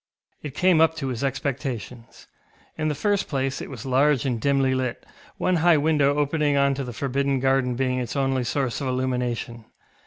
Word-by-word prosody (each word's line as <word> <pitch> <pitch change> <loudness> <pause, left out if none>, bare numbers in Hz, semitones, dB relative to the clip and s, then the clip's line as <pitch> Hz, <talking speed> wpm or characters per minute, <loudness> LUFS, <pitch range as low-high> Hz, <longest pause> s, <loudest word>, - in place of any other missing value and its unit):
It 145 -2 -7
came 180 -2 +4
up 160 0 +4
to 135 -4 -3
his 125 0 -4
expectations. 130 -4 -4 0.5
In 155 -1 -2
the 150 - -1
first 205 +5 0
place 135 -1 -2
it - - -7
was 125 -3 -8
large 135 +1 +2
and 120 -4 -1
dimly 135 -1 +2
lit, 130 -2 -3 0.3
one 185 -1 +1
high 165 0 +4
window 145 -2 +2
opening 145 0 +1
on 140 0 +3
to 135 0 -3
the 125 - -6
forbidden 140 +2 -1
garden 130 -1 +1
being 130 0 0
its 125 +1 -4
only 135 -2 0
source 130 +1 -2
of 135 - -2
illumination. 125 -2 -2
135 Hz, 185 wpm, -24 LUFS, 125-145 Hz, 0.5 s, came